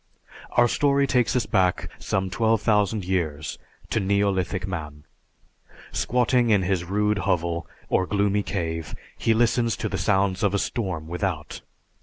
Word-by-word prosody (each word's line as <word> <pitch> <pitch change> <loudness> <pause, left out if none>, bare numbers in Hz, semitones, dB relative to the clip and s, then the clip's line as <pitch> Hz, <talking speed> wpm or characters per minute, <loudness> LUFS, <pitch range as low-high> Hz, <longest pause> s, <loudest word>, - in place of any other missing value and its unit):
_) - - -31 0.3
Our 120 0 +6
story 140 +2 +2
takes 125 -3 +1
us 125 -3 +1
back 95 -4 +1
some 95 -1 -1
twelve 110 +1 +1
thousand 105 -2 +2
years 80 -5 -2 0.3
to - - +2
neolithic 95 -2 0
man. 75 -5 -6 0.9
Squatting 125 0 +2
in 105 -3 +4
his 90 -1 0
rude 105 +3 0
hovel 85 -4 -1 0.2
or 95 - +1
gloomy 100 +1 +1
cave, 80 -5 -3 0.2
he 115 - +1
listens 115 -2 +2
to - - -2
the - - -3
sounds 95 -2 +1
of 100 -1 +2
a - - +3
storm 95 -8 -3
without. 85 -3 -3
100 Hz, 150 wpm, -24 LUFS, 90-110 Hz, 0.9 s, Our